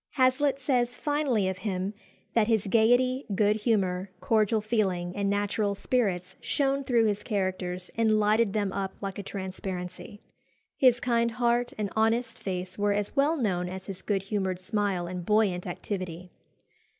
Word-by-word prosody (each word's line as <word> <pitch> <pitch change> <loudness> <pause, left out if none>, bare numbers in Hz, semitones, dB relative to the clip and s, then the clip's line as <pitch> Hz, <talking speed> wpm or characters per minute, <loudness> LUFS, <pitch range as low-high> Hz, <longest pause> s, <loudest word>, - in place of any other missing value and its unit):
Hazlitt 265 +2 +3
says 250 -2 +1
finely 285 -9 +1
of 190 -1 -3
him 190 0 -2 0.4
that 220 -2 +3
his 220 -3 +2
"gaiety, 245 +5 +3
good 210 +1 +3
humour, 195 -4 0
cordial 220 -1 +2
feeling, 195 -5 -1
and 200 -1 0
natural 205 0 0
spirits 190 -5 -1
shone 275 -1 0
through 240 -4 +3
his 210 -1 0
characters 185 -3 -2
and 220 -1 +3
lighted 215 0 +3
them 205 -3 0
up 195 -1 -3
like 195 -1 -5
a - - -2
transparency." 190 0 -6 0.6
His 250 -2 +4
kind 235 -1 +2
heart 240 +1 +1
and 210 -2 -2
honest 225 +2 +1
face 185 0 -4
were 205 0 +2
as 205 +4 -2
well 295 +4 +3
known 180 -8 0
as 185 0 -7
his 195 -2 -5
good 195 -3 -1
humoured 190 -3 -2
smile 190 -1 -1
and 180 0 -5
buoyant 200 -3 +2
activity. 180 -1 -5
205 Hz, 155 wpm, -28 LUFS, 190-235 Hz, 0.6 s, His